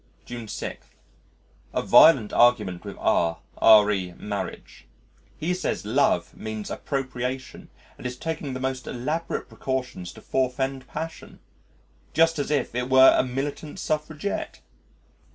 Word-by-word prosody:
June 120 -2 -7
6. - - -6 0.9
A - - +2
violent 135 -10 +6
argument 105 -7 +3
with - - -8
R 85 -1 +1 0.5
re 95 -4 -2
marriage. 100 -1 -6 0.5
He 170 +4 -1
says 180 - -2
Love - - +1
means 110 -1 -6
appropriation, 130 -1 -4 0.3
and - - -4
is 125 0 -6
taking 155 -3 -4
the - - -4
most 130 -1 -3
elaborate 150 +7 -3
precautions 125 -9 -4
to 110 - -13
forfend 130 +1 -1
passion 160 +1 -7 0.8
just 165 0 +4
as 145 - -2
if 145 -6 0
it 125 +1 -2
were 130 0 +7
a - - +3
militant 140 +5 -4
suffragette. 155 +3 -3
130 Hz, 125 wpm, -25 LUFS, 120-150 Hz, 0.9 s, were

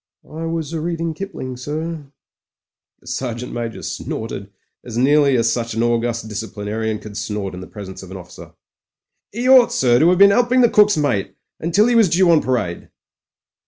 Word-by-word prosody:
"I 160 +1 -6
was 165 -1 -3
a'reading 165 0 -2
Kipling, 130 -8 -6
sir." 155 +3 -5 0.9
The - - -25
Sergeant 125 -1 -4
Major 115 -1 -5
snorted 100 -3 -5 0.3
as 120 -2 -7
nearly 140 +1 +4
as 115 0 +2
such 115 -2 -3
an 115 - 0
august 120 -1 -1
discipli 105 -1 -6
narian 110 +1 -2
could 105 -2 -11
snort 105 -2 -4
in 90 - -7
the 95 - -9
presence 95 -2 -9
of 95 - -11
his 95 - -7
officer. 90 -1 -12 0.4
" - - -31
'E 240 +2 -1
ought, 260 -2 +7
sir, 120 -2 +3
to 165 - +5
'ave 180 - +3
been 200 +1 +7
'elping 245 +4 +3
the 240 - +5
cook's 210 -3 +4
mate 140 -10 -1
— - - -64
until 185 +7 +3
'e 245 - +2
was 225 -5 +5
due 175 +1 +4
on 160 - +5
parade." 115 -10 -2
130 Hz, 190 wpm, -19 LUFS, 110-170 Hz, 0.9 s, ought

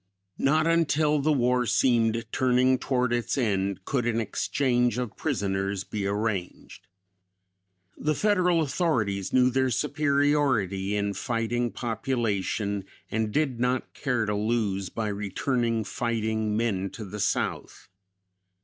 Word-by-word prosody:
"Not 155 +3 +3
until 155 -2 +2
the 150 +3 +2
war 125 -3 +2
seemed 115 -2 +2
turning 130 0 +3
toward 125 -2 0
its 120 +3 -1
end 100 -5 -1
could 125 -4 0
an 115 -1 +1
exchange 125 +2 0
of 125 -4 -3
prisoners 100 -7 -1
be 100 -1 -3
arranged. 100 -4 -3 1.1
The 155 0 -1
Federal 180 -4 +2
authorities 125 - 0
knew 125 0 +4
their 130 +1 +2
superiority 140 -8 +1
in 100 0 -1
fighting 120 +1 -1
population 110 -4 -2 0.3
and 110 -1 -1
did 135 -2 0
not 125 +1 -1
care 125 -6 -1
to 105 - -1
lose 105 -3 -1
by 110 +2 -3
returning 115 +3 -1
fighting 110 -2 -1
men 100 -4 0
to 110 +2 -7
the 105 +2 -7
South. - - -2
120 Hz, 120 wpm, -27 LUFS, 105-130 Hz, 1.1 s, knew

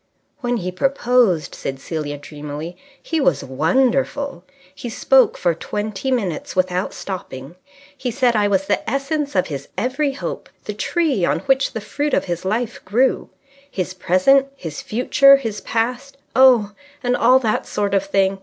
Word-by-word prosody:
"When 245 -3 -1
he 185 -3 -3
proposed," 240 - +2
said 135 0 -5
Celia 145 0 -4
dreamily, 150 +3 -7 0.3
"he 325 -2 -1
was 160 - +2
wonderful. 255 - 0 0.3
He 235 +6 -7
spoke 260 +1 +3
for 175 -2 +1
twenty 210 +8 -4
minutes 200 - -2
without 185 0 0
stopping. 145 -7 -7 0.4
He 260 -2 -3
said 245 -1 +2
I 205 -1 +3
was 195 -1 +1
the 205 - -1
essence 280 +2 -2
of 185 - +3
his 140 -3 -6
every 275 +3 0
hope, 275 - -6 0.2
the - - -4
tree 315 - 0
on - - +1
which 270 -1 +1
the 225 - -4
fruit 290 +7 -1
of - - 0
his 175 -2 -3
life 220 +4 -2
grew; 245 +7 +1 0.4
his 185 -6 -3
Present, 185 +10 +3
his 160 - -7
Future, 275 +4 +5
his 225 -6 -4
Past... 250 +4 -2 0.2
oh, 250 -6 +6 0.3
and 245 0 +1
all 250 +2 +5
that 225 -5 -1
sort 205 -1 -1
of 195 -1 +3
thing. 195 0 +1
215 Hz, 160 wpm, -20 LUFS, 180-265 Hz, 0.4 s, oh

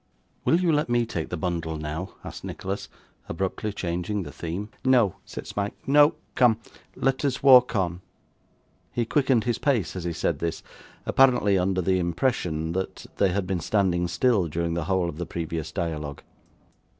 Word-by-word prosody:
'Will 165 - +4
you 180 -2 +2
let 150 -3 +1
me 120 0 +2
take 85 -8 -4
the 90 - -3
bundle 85 -2 -2
now?' 75 +5 -5
asked - - -8
Nicholas, 95 +1 -5 0.4
abruptly 95 +4 -2
changing 90 +2 -2
the - - -8
theme. 90 +6 -5
'No,' 125 -7 +4
said - - -7
Smike, 100 0 -3
'no. 145 +3 +6 0.2
Come, 120 -4 +4 0.4
let 135 +1 0
us 135 -2 -1
walk 125 -3 +7
on.' 90 -3 0 0.9
He 120 - -1
quickened 130 -3 +2
his 120 -2 -1
pace 120 - +1
as 90 - -4
he 85 -1 -2
said - - -1
this, 85 -1 -3 0.4
apparently 125 -7 +4
under 90 0 +1
the 95 +1 +2
impression 85 -3 -1
that 95 +2 -4
they 100 - +3
had 100 +1 -1
been 90 -1 -1
standing 90 -1 +1
still 105 -1 +2
during 85 +2 -2
the 85 -2 -2
whole 95 -1 +1
of 75 - -5
the 85 - -2
previous 80 -2 -4
dialogue. 80 -5 -4
95 Hz, 170 wpm, -26 LUFS, 85-120 Hz, 0.9 s, walk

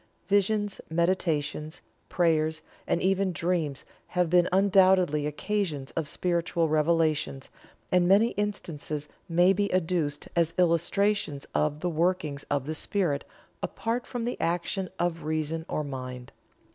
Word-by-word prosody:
Visions, 205 +1 +1
meditations, 160 -3 0 0.3
prayers, 160 -2 +1 0.2
and 175 - 0
even 190 0 +2
dreams 165 -5 -1 0.2
have 180 -2 0
been 175 0 +4
undoubtedly 185 -5 +4
occasions 150 -2 -2
of 160 -3 -3
spiritual 170 0 0
revelations, 155 -3 +1 0.4
and 180 -1 +4
many 205 +5 +5
instances 160 -8 -4 0.2
may 175 +3 +5
be 200 +1 0
adduced 165 -5 0
as 170 -1 +1
illustrations 175 -2 +1
of 150 0 0
the 180 - 0
workings 160 -3 0
of 140 -2 0
the 155 - -3
Spirit 160 -3 0 0.4
apart 235 +2 -2
from 240 -2 -3
the 245 - -3
action 175 +3 -1
of 170 -1 -1
reason 155 +1 -2
or 155 - -1
mind. 130 -3 -7
170 Hz, 125 wpm, -28 LUFS, 150-185 Hz, 0.4 s, many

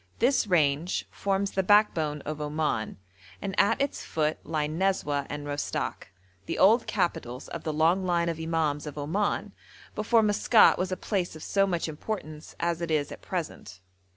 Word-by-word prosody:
This 245 -1 +2
range 160 -1 +1
forms 195 0 -1
the 190 - +1
backbone 175 -7 +3
of 155 +1 -5
Oman, 150 -7 -2 0.4
and 195 -1 -4
at 225 +3 +3
its 280 0 -1
foot 155 -1 -1
lie 155 -1 -1
Nezweh 155 -4 0
and 145 0 -5
Rostok, 145 0 -3 0.4
the - - -2
old 220 +5 +5
capitals 130 - -2
of 170 - -6
the 160 - -1
long 165 +5 +2
line 170 -2 +1
of 165 -1 -2
imams 160 -2 -1
of 150 - -7
Oman, 195 +7 -1 0.4
before 225 +1 +3
Maskat 215 +2 +5
was 185 +1 -1
a 185 - -1
place 185 -6 -2
of 155 - -9
so 195 -1 +2
much 175 -3 -1
importance 155 -1 -6
as 170 0 -1
it 170 - -3
is 150 -2 0
at - - -9
present. 160 - -5
170 Hz, 170 wpm, -27 LUFS, 150-195 Hz, 0.4 s, old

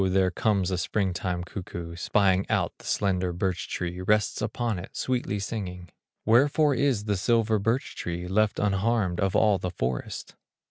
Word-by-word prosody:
there 95 0 +3
comes 100 -2 +1
a 90 - 0
spring 95 0 0
time 90 -1 -2
cuckoo, 85 -3 -7
Spying 95 +1 +2
out - - 0
the - - -15
slender 95 -3 +1
birch 90 0 -2
tree, 90 +1 -3
Rests 105 +3 +1
upon 110 -1 -1
it, 90 - -9
sweetly 125 -5 -1
singing: 95 -4 -5 0.4
"Wherefore 140 +6 +4
is 130 -5 +1
the 105 -1 +1
silver 110 +2 +2
birch 115 +6 -1
tree 90 +1 -4
Left 105 +3 +2
unharmed 100 -2 +1
of 95 -2 +1
all 105 -3 +4
the 90 - -2
forest?" 65 -7 -4
95 Hz, 165 wpm, -27 LUFS, 90-110 Hz, 0.4 s, Wherefore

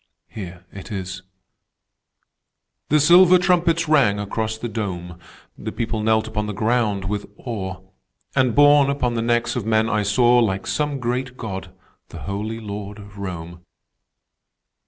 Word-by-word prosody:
Here 90 -3 -9
it 100 +3 -10
is: 95 -2 -5 1.7
"The 150 - +4
silver 175 +4 +7
trumpets 170 -2 +2
rang 135 -10 +4
across 110 +2 -3
the 120 - -4
Dome; 90 -6 -5 0.4
The - - -5
people 110 -1 -2
knelt 110 0 +2
upon 105 -1 -3
the 105 - -3
ground 110 -3 0
with 105 +2 -3
awe; 95 -7 -5 0.5
And 130 -4 +2
borne 145 -1 +6
upon 125 -4 0
the 115 - -1
necks 120 0 +1
of 125 - -2
men 110 +1 +2
I 110 - +1
saw, 120 +4 +4
Like 95 -5 0
some 150 -2 -1
great 125 +1 -3
God, 95 -5 -6 0.4
the - - -9
Holy 105 +4 -4
Lord 105 -1 -7
of 100 -1 -12
Rome. 85 -3 -6
110 Hz, 145 wpm, -22 LUFS, 100-125 Hz, 1.7 s, silver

